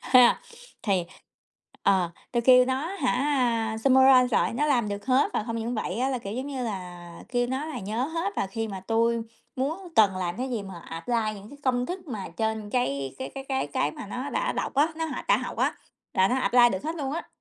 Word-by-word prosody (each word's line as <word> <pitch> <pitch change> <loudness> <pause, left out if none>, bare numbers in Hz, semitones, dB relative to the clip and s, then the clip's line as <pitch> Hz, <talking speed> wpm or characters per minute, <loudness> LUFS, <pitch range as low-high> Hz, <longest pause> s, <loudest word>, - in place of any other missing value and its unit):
Ha. 250 -2 +5 0.4
Thì 195 -5 +1 0.8
ờ, 185 -3 +3 0.2
tôi 240 - +2
kêu 250 0 +7
nó 265 +4 -1
hả, 260 -3 +2
a, 245 -5 +1
summarize 260 +1 +6
lại - - +2
nó 295 +5 +1
làm 240 -7 +2
được 205 +2 -5
hết, 260 +1 +3
và - - -1
không 230 -1 -3
những 230 +2 -2
vậy 215 -2 -3
á 260 - +2
là, 260 -2 -1
kiểu 200 -3 -6
giống 255 +4 -4
như 270 -3 -3
là, 180 -5 -6 0.2
kêu 245 0 +1
nó 260 +4 -2
là 315 - -5
nhớ 215 +6 -2
hết, 335 +6 -2
và - - 0
khi 225 +3 -4
mà 195 -2 -6
tui 230 +4 +1 0.4
muốn 320 +8 -2
cần 200 -4 +5
làm 180 -2 -2
cái 255 +2 -3
gì 230 -4 -2
mà 190 -3 -9
apply 165 +9 -3 0.2
những 205 +1 -11
cái 285 - -12
công 250 -1 +1
thức 360 0 -6
mà 210 -7 -5
trên 220 -1 -2
cái 140 - -1
cái 260 - -4
cái 270 -1 -6
cái 265 - -1
cái 145 0 0
mà - - -8
nó 255 +7 -5
đã - - 0
đọc - - -3
á, 290 +4 +4
nó 325 - -1
hoạt - - -5
đã - - +5
học - - -5
á, - - +1 0.4
là 190 0 +4
nó 250 - +1
apply 245 -2 +5
được 190 - -4
hết 320 +2 -2
luôn 280 -3 -3
á. 330 - -4
245 Hz, 235 wpm, -26 LUFS, 205-265 Hz, 0.8 s, kêu